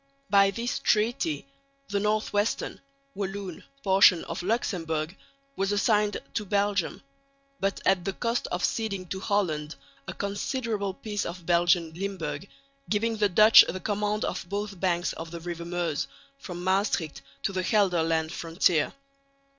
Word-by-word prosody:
By 200 -1 +6
this 235 +5 -2
treaty 240 +9 +1 0.4
the 200 0 0
northwestern 210 0 0 0.3
(Walloon) 195 -3 -5 0.2
portion 190 -3 +6
of - - -4
Luxemburg 175 -6 -1 0.4
was 195 +1 0
assigned 210 0 +2 0.2
to 210 - -1
Belgium, 200 -2 0 0.6
but 195 0 0
at 185 -2 +3
the 195 - -2
cost 235 +3 -1
of 180 - -3
ceding 200 -5 -2
to 190 - -3
Holland 165 -7 -1 0.3
a - - -4
considerable 200 -1 -2
piece 205 -1 -3
of 175 0 -6
Belgian 175 -1 +3
Limburg 195 +1 -4 0.4
giving 225 +2 +1
the 205 -1 +3
Dutch 215 +4 +9
the 185 - -3
command 210 +2 -1
of 175 - -4
both 200 -1 -4
banks 175 -1 0
of 165 0 -7
the 170 0 -7
river 170 0 -5
Meuse 170 -3 -1 0.3
from 180 -6 -7
Maestricht 185 -4 0 0.2
to 195 - -1
the 185 - 0
Gelderland 165 -5 +2
frontier. 165 -2 +1
195 Hz, 140 wpm, -27 LUFS, 175-210 Hz, 0.6 s, Dutch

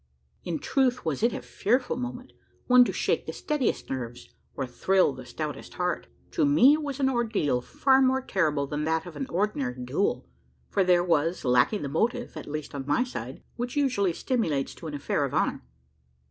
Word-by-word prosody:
In 170 -2 -2
truth 255 - +1
was 155 -4 -1
it 235 +2 +3
a - - -5
fearful 250 +5 0
moment 250 0 -6 0.3
one 250 0 +7
to - - -1
shake - - -1
the - - -4
steadiest 295 -5 -1
nerves, 120 -2 -6 0.2
or 135 - -2
thrill 180 +6 +2
the 130 -1 -10
stoutest 150 -2 -6
heart. 180 0 -2 0.2
To 330 - +1
me, 285 -1 +6
it 310 - 0
was 285 -2 -4
an 270 - +3
ordeal 225 - +1
far 265 - +3
more 260 0 +3
terrible 155 - +1
than 150 +2 -3
that 160 0 0
of 175 -3 -9
an 140 -2 -4
ordinary 155 -10 -1
duel; 145 +11 0 0.4
for 195 - +2
there 180 -1 +4
was, 165 -1 +1
lacking 125 - +3
the - - -2
motive 235 - -1
at - - -7
least 150 0 -5
on 140 -1 -5
my 145 +12 +3
side 255 - -7
which 245 +2 -3
usually 250 -10 +2
stimulates 165 - -1
to 165 - -9
an 150 - -5
affair 145 0 -1
of 140 - -2
honour. - - +1
180 Hz, 190 wpm, -27 LUFS, -, 0.4 s, one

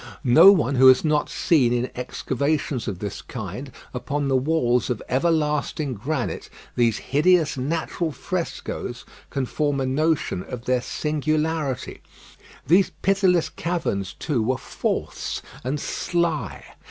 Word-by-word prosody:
No 130 +9 +8
one 150 -8 +2
who 130 +1 +7
has 130 +4 +6
not 150 -1 +1
seen 135 -8 +2
in 120 +1 -1
excavations 135 +1 -2
of 100 -4 -3
this 100 +1 -5
kind, 125 +4 -7 0.2
upon 140 +3 -2
the 135 - +2
walls 130 -3 +1
of 120 -4 -1
everlasting 150 -1 0
granite, 125 +4 -3 0.3
these 115 -3 +2
hideous 155 +2 +2
natural 160 +4 -2
frescoes, 170 +6 -4 0.2
can 135 -2 -2
form 145 +1 -1
a 135 - 0
notion 145 - 0
of 120 +4 -8
their 125 -1 +1
singularity. 155 -1 -2 0.6
These 180 +4 +4
pitiless 185 -4 +3
caverns, 150 - -2
too, 135 -7 -1
were 125 +4 0
false - - -3 0.2
and 135 +4 -2
sly. 165 - -2
140 Hz, 130 wpm, -23 LUFS, 125-160 Hz, 0.6 s, No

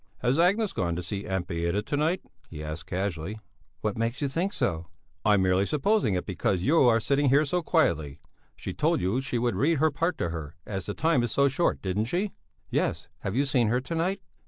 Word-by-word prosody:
"Has 125 +5 +2
Agnes 200 +5 +3
gone 85 -2 -1
to 90 - -4
see 100 +3 -4
Aunt 95 -2 -1
Beata 85 +4 -1
to 145 - -2
night?" 160 +5 +1 0.3
he 75 -2 -7
asked 75 +2 -6
casually. 95 +1 -3 0.4
"What 105 0 -2
makes 115 +4 -1
you 145 - 0
think 170 +8 -1
so?" 85 - -1 0.4
"I'm 105 -3 +4
merely 95 +1 +2
supposing 175 - +2
it 90 - -2
because 90 -1 -1
you 160 +5 +4
are 115 -1 +5
sitting 140 +4 +2
here 145 +4 +4
so 175 +5 0
quietly. 80 - +1 0.4
She - - -6
told - - +1
you 100 +9 0
she 135 -2 -2
would 120 0 +1
read 160 +4 +2
her 155 +2 +3
part 165 +4 -1
to 85 - -1
her, 80 -1 -6
as 95 -3 -5
the 105 - -3
time 160 -5 +2
is 120 -2 -1
so 140 +2 +4
short, 155 +6 0
didn't 100 +3 0
she?" 185 - -1 0.4
"Yes; - - -1
have 95 +2 -3
you 140 +3 +2
seen 125 -4 +2
her 120 +3 +2
to 150 - -6
night?" 185 +4 0
115 Hz, 220 wpm, -27 LUFS, 95-155 Hz, 0.4 s, are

